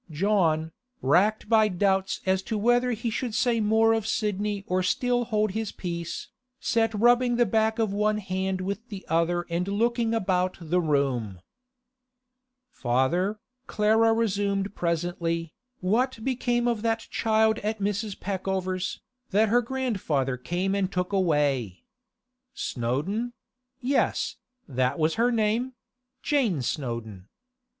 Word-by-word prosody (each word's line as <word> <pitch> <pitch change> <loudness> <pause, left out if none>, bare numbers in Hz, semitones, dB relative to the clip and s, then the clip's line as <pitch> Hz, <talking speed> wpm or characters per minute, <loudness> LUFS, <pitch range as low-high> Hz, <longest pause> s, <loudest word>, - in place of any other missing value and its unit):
John, 160 -2 +1 0.3
racked 190 +12 +3
by 220 -1 +5
doubts 195 0 0
as 190 0 +2
to 220 - 0
whether 240 +3 +3
he 230 -1 -2
should 235 -1 -3
say 240 -2 +2
more 220 +1 +4
of 220 -1 -1
Sidney 210 -2 -1
or 185 +1 0
still 245 +6 +1
hold 215 -2 0
his 220 +1 -3
peace, 170 -2 -5 0.3
sat 225 -1 +1
rubbing 240 +3 +4
the 240 0 +4
back 220 +2 +1
of 220 -3 0
one 210 +1 +1
hand 190 -1 -2
with 200 +5 -4
the 200 -3 -8
other 170 +1 +1
and 175 +2 -2
looking 230 +2 +1
about 185 -3 0
the 175 +1 0
room. 135 - 0 1.3
'Father,' 155 - 0 0.3
Clara 220 +2 +3
resumed 200 -3 0
presently, 170 -1 -2 0.3
'what 225 +5 0
became 245 -1 0
of 235 -3 0
that 225 0 0
child 220 -1 +2
at 215 +1 -2
Mrs. 205 0 -2
Peckover's, 190 -1 -2 0.3
that 215 +2 +3
her 240 +3 +4
grandfather 205 - -1
came 175 +9 -2
and 195 -1 0
took 180 +1 -2
away? 145 - +1 0.7
Snowdon; 160 - -2 0.5
yes, 270 +3 0 0.3
that 130 -2 0
was 160 0 +2
her 240 +5 +2
name; 230 +3 0 0.5
Jane 230 - +1
Snowdon. 115 - -4
200 Hz, 130 wpm, -26 LUFS, 175-225 Hz, 1.3 s, by